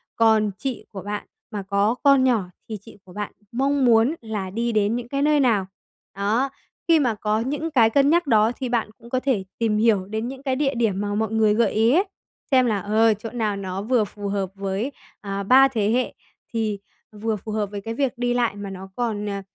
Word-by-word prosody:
còn 220 -2 +3
chị 265 -1 -4
của 195 - -7
bạn 205 +1 -4 0.3
mà 205 -3 -4
có 200 +4 +1
con 275 -2 +6
nhỏ 240 -6 +3 0.3
thì 215 - -4
chị 225 - -15
của 180 - -14
bạn 210 +1 -4 0.2
mong 275 +2 +1
muốn 235 +5 +4
là 215 -4 -4
đi 235 +5 -1
đến 215 0 +1
những 240 -1 -4
cái 275 +2 -2
nơi 300 0 +3
nào. 225 -8 +3 0.5
Đó, 215 +7 +1 0.4
khi 330 -2 +5
mà 245 -6 +1
có 210 +1 0
những 295 +7 -2
cái 235 -6 +5
cân 280 +4 +3
nhắc 340 +1 +3
đó, 220 -2 +4
thì 260 -2 -3
bạn 235 -3 0
cũng 235 0 -15
có 255 - 0
thể 255 -7 0 0.2
tìm 220 -2 +1
hiểu 215 -4 +3
đến 220 +4 -3
những 265 +1 -8
cái 265 -2 0
địa 275 0 +1
điểm 215 -5 0
mà 205 0 -2
mọi 220 0 -1
người 220 -1 +3
gợi 230 +1 +2
ý 225 +2 +3
ấy, 360 +5 +4 0.5
xem 255 -2 +5
là, 215 -4 +1
ờ, 220 +3 +3
chỗ 215 +2 -7
nào 220 -3 -1
nó 190 -1 -4
vừa 235 +1 +2
phù 205 0 -7
hợp 195 -2 -1
với, 195 +6 -2 0.3
à, 200 -1 -4
3 260 +6 +7
thế 220 -6 0
hệ, 250 +2 0 0.4
thì 215 -3 -1 0.3
vừa 220 +1 -2
phù 210 +2 -7
hợp 210 -2 -1
với 205 -1 -5
cái 225 +3 -5
việc 270 +1 0
đi 245 0 0
lại, 240 -4 +1
mà 205 -1 -6
nó 190 0 -8
còn, 220 -4 -2
ờ, 200 -1 -3
225 Hz, 230 wpm, -23 LUFS, 205-250 Hz, 0.5 s, 3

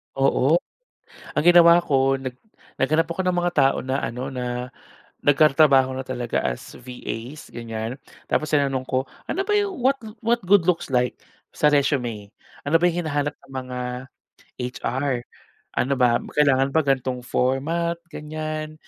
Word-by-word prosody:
Oo 135 +3 +3 0.8
ang - - +1
ginawa 175 0 +7
ko 135 -4 +2
nag 130 -2 -4 0.4
naghanap 155 +4 +2
ako 180 +2 -2
ng 180 - +2
mga 175 0 +1
tao 135 - +4
na 130 +1 -1
ano 125 +3 -4
na 125 -1 -4 0.5
nagtatrabaho 140 -2 +4
na 130 - -3
talaga 125 -2 -2
as - - -4
VAs 125 +2 -7
ganyan. 115 +1 -5 0.3
Tapos 155 - 0
tinanong 140 -3 +1
ko, 130 +1 0 0.2
"Ano 385 +3 -1
ba 420 - 0
'yong 410 -2 +1
what 265 +2 +2 0.3
what 235 0 +2
good 190 -2 +5
looks 175 -4 0
like 125 -2 +1 0.4
sa 150 - +3
resume?" 125 -8 0 0.3
Ano 165 +4 +3
ba - - +4
'yong 175 -1 -3
hinahanap 145 -1 -1
ng 135 - -16
mga 125 0 -6 1.0
HR? 130 -1 -1 0.6
Ano 135 +3 +1
ba 125 -3 +3 0.2
kailangan 140 -2 +3
ba 160 - +4
ganong 130 -2 -1
format, 145 +8 0 0.2
ganyan. 155 0 -5
135 Hz, 145 wpm, -23 LUFS, 125-160 Hz, 1.0 s, ginawa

